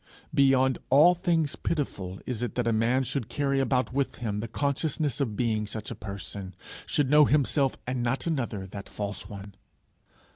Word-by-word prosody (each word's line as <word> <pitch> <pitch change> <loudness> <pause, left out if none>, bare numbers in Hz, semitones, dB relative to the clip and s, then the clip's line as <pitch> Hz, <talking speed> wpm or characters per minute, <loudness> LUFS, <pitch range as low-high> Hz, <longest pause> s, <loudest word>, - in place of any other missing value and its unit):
Beyond 135 -2 +4
all 155 +7 +7
things 165 -4 0
pitiful 100 - -3
is 120 -3 -3
it 120 -3 -3
that 125 - 0
a 115 - +2
man 120 +4 +2
should 130 -2 -3
carry 140 -2 0
about 130 -1 +1
with 140 0 0
him 105 -4 -3
the 115 - -3
consciousness 145 +1 -1
of 115 -6 -1
being 110 -2 0
such 105 0 -6
a - - -4
person 100 -2 -7 0.3
should 145 -2 +1
know 150 0 +8
himself 140 -1 +2
and 125 0 -2
not 120 +2 -1
another 120 - -2
that 100 +1 -8
false 100 -1 -5
one! 100 -1 -9
125 Hz, 175 wpm, -28 LUFS, 105-140 Hz, 0.3 s, know